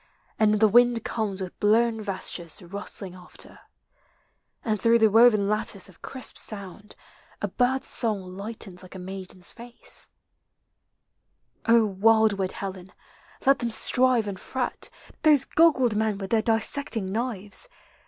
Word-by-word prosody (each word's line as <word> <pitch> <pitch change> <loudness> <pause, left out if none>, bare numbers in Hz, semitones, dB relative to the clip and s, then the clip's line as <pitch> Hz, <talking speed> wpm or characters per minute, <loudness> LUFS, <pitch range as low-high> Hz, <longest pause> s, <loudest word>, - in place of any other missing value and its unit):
And 215 -1 +4
the 220 - +6
wind 240 +1 +4
comes 205 -4 -3
with 185 -2 -7
blown 225 +2 +2
vestures 185 -4 -3
rustling 195 0 -5
after, 180 -1 -10 1.1
And 215 -3 -1
through 230 +2 +5
the 220 -2 +4
woven 220 -2 +5
lattice 210 -2 -1
of 185 - -20
crisp 260 -2 -6
sound 205 0 -6 0.4
A - - -1
bird's 260 +1 0
song 215 -5 +2
lightens 200 -2 -5
like 185 0 -13
a - - -6
maiden's 185 -1 -7
face, 240 +1 -7 1.6
O 230 -1 +5
wildwood 205 -1 +2
Helen, 190 -1 -7 0.5
let 275 +1 +5
them 240 - -1
strive 245 0 +3
and 195 -2 -5
fret, 260 -1 -3 0.3
Those 295 -4 +5
goggled 270 -9 +3
men 215 -1 0
with 195 -1 -7
their 225 -1 +3
dissecting 225 -2 0
knives 225 - -2
215 Hz, 135 wpm, -26 LUFS, 195-235 Hz, 1.6 s, the